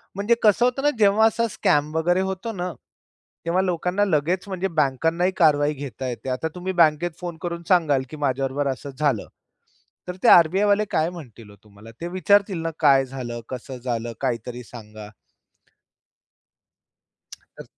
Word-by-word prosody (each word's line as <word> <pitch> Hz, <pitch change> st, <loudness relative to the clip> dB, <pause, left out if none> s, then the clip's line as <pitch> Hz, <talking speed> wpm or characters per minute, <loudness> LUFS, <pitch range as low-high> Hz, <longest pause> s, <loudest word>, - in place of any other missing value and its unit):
म्हणजे 205 Hz, +4 st, +2 dB
कसं 215 Hz, +2 st, +4 dB
होतं 250 Hz, +2 st, -1 dB
ना, 290 Hz, -, +4 dB
जेव्हा 210 Hz, +1 st, +5 dB
असा 230 Hz, +1 st, 0 dB
स्कॅम 150 Hz, -5 st, 0 dB
वगैरे 175 Hz, +3 st, +2 dB
होतो 190 Hz, +5 st, -4 dB
ना, 180 Hz, -2 st, -4 dB, 0.7 s
तेव्हा 175 Hz, +3 st, +1 dB
लोकांना 180 Hz, +2 st, 0 dB
लगेच 175 Hz, +2 st, 0 dB
म्हणजे 190 Hz, -1 st, -2 dB
बँकांनाही 165 Hz, +6 st, +1 dB
कारवाई 150 Hz, -3 st, +3 dB
घेता 135 Hz, -2 st, -6 dB
येते. 125 Hz, +2 st, -6 dB
आता 130 Hz, +5 st, -2 dB
तुम्ही 180 Hz, +1 st, -4 dB
बँकेत 160 Hz, +2 st, +3 dB
फोन 175 Hz, -2 st, -6 dB
करून 170 Hz, -1 st, -4 dB
सांगाल 155 Hz, -7 st, +3 dB
की 155 Hz, -, -9 dB
माझ्याबरोबर 135 Hz, +1 st, -1 dB
असं 135 Hz, +2 st, -7 dB
झालं, 140 Hz, -8 st, 0 dB, 0.8 s
तर 180 Hz, -, -5 dB
ते -, -, +4 dB
आर-बी-आयवाले 200 Hz, +5 st, +5 dB
काय 160 Hz, +1 st, +1 dB
म्हणतील 125 Hz, -, -12 dB
हो 105 Hz, -, -15 dB
तुम्हाला? 105 Hz, +1 st, -15 dB
ते 170 Hz, -, -3 dB
विचारतील 185 Hz, +1 st, +2 dB
ना 165 Hz, 0 st, -2 dB
काय 135 Hz, -3 st, +5 dB
झालं? 125 Hz, -3 st, -6 dB
कसं 130 Hz, +1 st, -7 dB
झालं? 120 Hz, -1 st, -3 dB
काहीतरी 120 Hz, +1 st, -3 dB
सांगा. 110 Hz, -3 st, -11 dB, 2.3 s
तर -, -, -15 dB
160 Hz, 150 wpm, -23 LUFS, 130-185 Hz, 2.3 s, जेव्हा